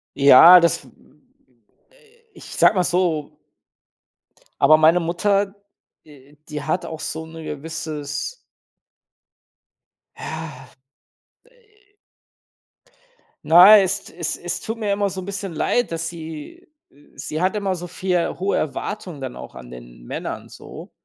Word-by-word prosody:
Ja, 145 +6 +9
das, 170 -5 0
äh - - -17 1.4
ich - - -14
sage - - +3
mal 180 - +2
so 175 -4 -1 1.2
aber 155 - +6
meine 160 +3 +4
Mutter, 195 +4 0 0.5
äh, 145 -1 -19
die 150 -1 -6
hat 170 +5 -2
auch 160 -1 -7
so 160 +1 -5
'ne 160 0 -11
gewisses 155 - -5 1.8
Ja. 155 -5 -8 0.8
Äh 425 -4 -30 1.5
Na, 185 +6 +9
es 190 -1 -1
es 170 -1 -4
es 175 - -4
tut 225 +1 -5
mir 210 -3 -1
immer 200 0 0
so 190 0 -6
'n - - -9
bisschen 195 -2 -5
leid, 245 +7 0
dass 165 0 -3
sie 165 - -10 0.5
sie 155 +2 -5
hat 185 +3 +1
immer 200 -2 -1
so 175 0 -7
viel 180 -1 -2
hohe 195 +2 -1
Erwartungen 175 +1 -5
dann 130 - -6
auch 65 - -11
an 60 0 -11
den - - -13
Männern - - -6
so. - - -12
170 Hz, 130 wpm, -21 LUFS, 155-195 Hz, 1.8 s, Ja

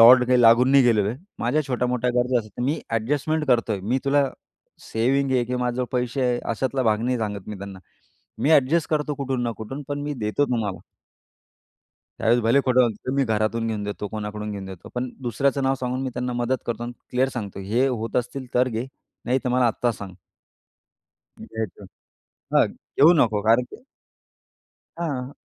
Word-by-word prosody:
लॉर्डने 125 +2 +9
काही 125 -1 +5
लागून 120 +3 +6
नाही 140 -1 +7
गेलेलो 105 -4 +3
आहे 120 +5 -4 0.2
माझ्या 140 +6 +1
छोट्या-मोठ्या 125 -1 0
गरजा 125 0 +2
असतात. 110 +1 -8
मी 145 +4 0
ॲडजस्टमेंट 145 +7 0
करतोय 115 -5 +2
मी 120 +8 0
तुला 140 +1 +3 0.7
सेव्हिंग 135 +4 +1
आहे 125 -2 +2
की 125 +1 -3
माझ्याजवळ 125 0 -1
पैसे 125 +2 -1
आहे." 125 -1 +1
अशातला 130 +3 -1
भाग 110 -2 +2
नाही 125 +1 +1
सांगत 105 -3 -4
मी 105 - -6
त्यांना 100 -1 -8 0.6
"मी 145 - +1
ॲडजस्ट 150 +3 +3
करतो 150 -1 0
कुठून 135 -3 -2
ना 120 - -1
कुठून 135 +6 -6
पण 145 0 -3
मी 145 0 -3
देतो 105 +7 +1
तुम्हाला." 115 -7 -2 1.4
त्यावेळेस 120 +2 +3
भले 115 +5 +4
खोटं 130 0 +5
बोलतो 120 +1 -1
मी 140 - +3
घरातून 110 0 0
घेऊन 105 -2 -2
देतो 105 0 -4
कोणाकडून 105 0 -5
घेऊन 100 -1 -6
देतो 95 -2 -10
पण 125 0 -2
दुसऱ्याचं 135 +3 0
नाव 135 0 +2
सांगून 125 +1 -2
मी 130 - -2
त्यांना 125 0 -2
मदत 120 +1 -1
करतो 120 -1 -3
आणि 120 - -4 0.2
क्लिअर 130 +1 +2
सांगतो 100 -5 -5
"हे 115 +8 +1
होत 115 -3 -3
असतील 125 +2 -2
तर 125 +1 +3
घे 115 +1 -3 0.4
नाहीतर 125 +1 0
मला 125 0 +3
आत्ता 120 +1 0
सांग." 100 -3 -8 1.3
द्यायचं. 110 -3 -6 0.7
हां, - - +6 0.3
घेऊ 160 +5 +8
नको. 110 -7 +3
कारण 115 +3 +5
की - - -8 1.2
हां. 140 -6 -3
125 Hz, 175 wpm, -24 LUFS, 110-130 Hz, 1.4 s, लॉर्डने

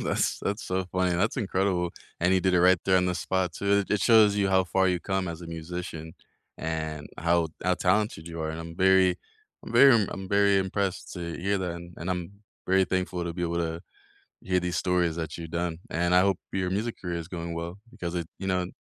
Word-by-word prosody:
That's - - 0
that's 100 +2 -2
so 95 0 -1
funny, 95 -1 +1
that's 105 +5 0
incredible, 95 -5 0 0.3
and 90 +2 +3
he 95 - +4
did 95 +1 +2
it 90 - +4
right 90 +1 +6
there 95 -1 +4
on 90 0 +3
the 90 - 0
spot 95 -1 -1
too. 100 +2 +1
It 105 - +1
shows 105 -1 +6
you 100 -1 +2
how 95 -1 +3
far 95 +2 +2
you 90 -2 +1
come 95 -1 -1
as 85 0 -6
a 85 - -8
musician 80 -1 -6 0.5
and 80 -2 -4
how 85 0 +2 0.2
how 90 0 +3
talented 90 -3 0
you 85 -1 -6
are, 80 0 -2
and 80 +1 -5
I'm 85 0 -8
very 95 -1 +4 0.5
I'm - - -8
very 140 -1 +8
I'm 105 -4 +2
I'm 95 -1 -6
very 100 -1 +4
impressed 95 0 -2
to 85 -2 -5
hear 100 +2 0
that, 90 -2 -2
and 85 0 -9
and 90 +2 -4
I'm 90 0 -3 0.3
very 95 +1 +4
thankful 90 -1 -2
to 85 - -3
be 90 - -4
able 85 0 -1
to 85 -1 -2 0.6
hear 90 -1 +1
these 90 0 -2
stories 90 -3 +1
that 80 -2 -4
you've 80 -1 -7
done, 85 -1 -2
and 85 +1 +1
I 90 - +7
hope 100 -1 +2
your 95 -1 -1
music 110 +5 -2
career 85 -2 -3
is 80 - -7
going 85 -2 -5
well, 85 +2 -5
because 90 -8 -5
it 85 -2 -2
you 95 - -4
know, 90 -1 +1
an 90 - -5
90 Hz, 230 wpm, -27 LUFS, 85-95 Hz, 0.6 s, very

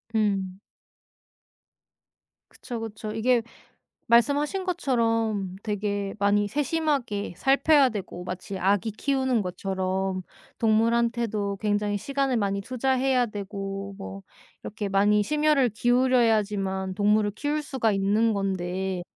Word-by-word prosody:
음. 195 -3 0 1.9
그쵸, 240 -3 -7
그쵸. 220 -1 -6
이게 235 +2 +2 0.7
말씀하신 285 - +3
것처럼 230 - 0
되게 205 -1 -2
많이 205 0 +2
세심하게 280 - -1
살펴야 275 +1 +4
되고 190 -5 -6
마치 185 +2 -6
아기 200 +4 +1
키우는 260 +1 0
것처럼 190 0 -2 0.4
동물한테도 225 -2 +1
굉장히 205 -1 0
시간을 275 +3 -1
많이 200 -2 0
투자해야 255 +2 +1
되고 200 -1 -6
뭐 195 0 -8 0.4
이렇게 210 -1 -4
많이 205 +2 +3
심혈을 300 0 +2
기울여야지만 215 -6 +1
동물을 210 +1 +2
키울 295 +7 -2
수가 265 -7 0
있는 205 +3 +2
건데 190 -1 -2
215 Hz, 255 characters per minute, -26 LUFS, 195-250 Hz, 1.9 s, 살펴야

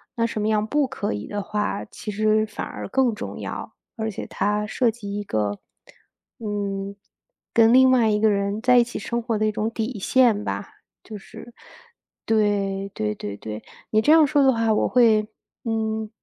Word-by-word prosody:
那 230 -2 +1
什 225 -2 -3
么 210 - 0
样 215 -1 +1
不 290 +2 +1
可 205 - -3
以 105 +1 -5
的 205 -1 -4
话， 210 - -2
其 - - -9
实 215 +1 +2
反 215 - -6
而 - - -7
更 255 +1 +2
重 215 - -6
要， - - -6 0.2
而 220 0 -2
且 200 - -6
它 210 +1 -1
涉 235 +3 +1
及 210 -3 -6
一 - - -4
个， 105 - -2 0.8
嗯， 200 -2 -3 0.6
跟 230 0 +6
另 260 0 +7
外 235 -4 +4
一 210 0 +2
个 220 - +4
人 200 +2 -1
在 250 0 +5
一 240 - +5
起 240 - -7
生 235 +3 -2
活 225 -2 -1
的 215 - +1
一 - - +1
种 215 +1 -1
底 225 -1 -3
线 230 -2 +3
吧。 - - -5 0.3
就 215 - -8
是 225 +4 -12 0.7
对， 200 -3 +1
对 105 0 -1
对 105 0 -6
对， 110 0 -7 0.3
你 215 - +4
这 295 - +3
样 320 -1 +7
说 290 0 +3
的 265 - +6
话 225 -1 +1
我 - - +2
会 220 -4 +4 0.4
嗯， 220 -1 -2
215 Hz, 205 characters per minute, -23 LUFS, 205-230 Hz, 0.8 s, 另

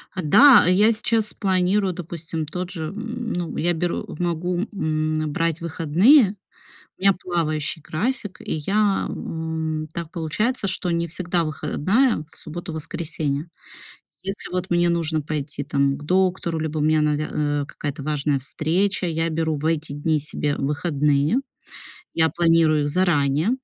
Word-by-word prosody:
Да, 220 - +7
я 200 +5 +5
сейчас 220 0 0
планирую, 190 0 +1
допустим, 165 -2 -5
тот 180 +4 -5
же, 165 -4 -4
м, 225 +6 -5
ну, 175 -2 -3
я 175 +1 +1
беру, 175 +1 -2
могу, 175 +1 -1 0.2
м, 155 -3 -1
э, - - -2
брать 165 +1 -1
выходные, 185 - +4 0.6
у - - -25
меня 195 0 +5
плавающий 160 -4 -2
график, 205 - -3
и - - -4
я, 195 +6 +1
м, 160 -1 -3
так 170 -1 -5
получается, 195 +8 -1
что 185 -1 -1
не 170 0 0
всегда 170 +1 -1
выходная 185 - +1
в - - -6
субботу, 170 +2 -6
воскресенье. 155 -1 -2 0.8
Если 195 +1 -6
вот 180 0 -2
мне 175 0 +3
нужно 165 -2 0
пойти 145 -1 -4
там 140 -1 +1
к 145 - -11
доктору, 180 -1 +1
либо 155 0 -3
у - - 0
меня 155 +1 +3
навя 150 0 0
а, 145 -1 0
какая-то 145 +1 -6
важная 145 -1 0
встреча, 175 +8 -1
я 165 0 -1
беру 160 -1 0
в 145 - -6
эти 160 -2 0
дни 155 +2 +1
себе 145 0 -2
выходные. 145 - +1 0.8
Я 160 -1 +3
планирую 165 -3 +3
заранее, 150 -1 +2
165 Hz, 145 wpm, -23 LUFS, 155-185 Hz, 0.8 s, Да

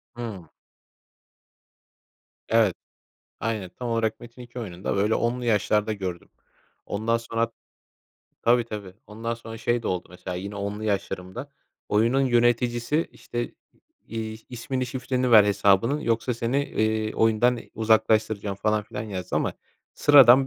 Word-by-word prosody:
Hımm. 105 -9 -6 2.0
Evet. 110 -5 +4 0.7
Aynen, 105 -4 -2
tam 125 - -4
olarak 115 -1 0
Metin2 120 +1 -10
oyununda, 95 -2 -3
böyle, 105 +3 +2
10'lu 120 +1 0
yaşlarda 105 -1 +2
gördüm. 95 -4 -5 0.6
Ondan 110 +3 0
sonra 115 0 -1 0.9
Tabii, 120 0 +4
tabii 105 -5 -7
ondan 115 +2 -4
sonra 115 -1 -9
şey 120 +1 0
de - - -2
oldu 90 -1 -2
mesela 90 0 -6
yine 100 +3 -5
10'lu 100 +2 -4
yaşlarımda 95 +3 -3 0.4
oyunun 115 +6 +3
yöneticisi, 120 +3 +2
işte, 120 0 -5 0.5
iii, 110 -1 -5
"İsmini, 130 +1 -3
şifreni 125 0 -1
ver 110 -3 +9
hesabının 100 +7 +3
yoksa 115 -1 0
seni, 115 +3 -1
eee, 110 -3 0
oyundan 115 +2 +3 0.2
uzaklaştıracağım." 110 -2 +2
falan 105 +1 +1
filan 105 - -6
yazdı 95 -4 -4
ama - - 0 0.4
sıradan 135 -2 +7
115 Hz, 125 wpm, -25 LUFS, 105-120 Hz, 2.0 s, ver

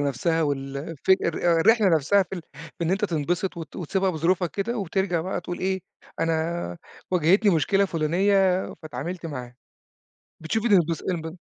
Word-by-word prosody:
نفْسها 145 +4 0
والفك 145 +6 0
الر 170 0 +2
الرحلة 220 +3 +5
نفْسها 165 +4 +3
في 190 - -8
ال 175 - -6
في 160 +3 -7
إن 165 - 0
أنت 195 +3 +1
تنبسط 175 +1 -1
وت 160 -4 -8
وتسيبها 190 +2 0
بظروفها 175 +2 +1
كده 230 +4 -3
وترجع 190 -2 0
بقى 185 +3 -3
تقول 175 - -6
إيه، 190 0 -1 0.4
أنا 165 - -1 0.3
واجهتني 185 +3 +4
مشكلة 195 +5 +3
فُلانية 185 +3 +2 0.2
فاتعاملت 160 +5 -5
معاها، 125 -5 -7 0.8
بتشوف 210 +8 -2
الانبس 170 -7 +3
انب 160 -1 -4
170 Hz, 145 wpm, -25 LUFS, 160-190 Hz, 0.8 s, الرحلة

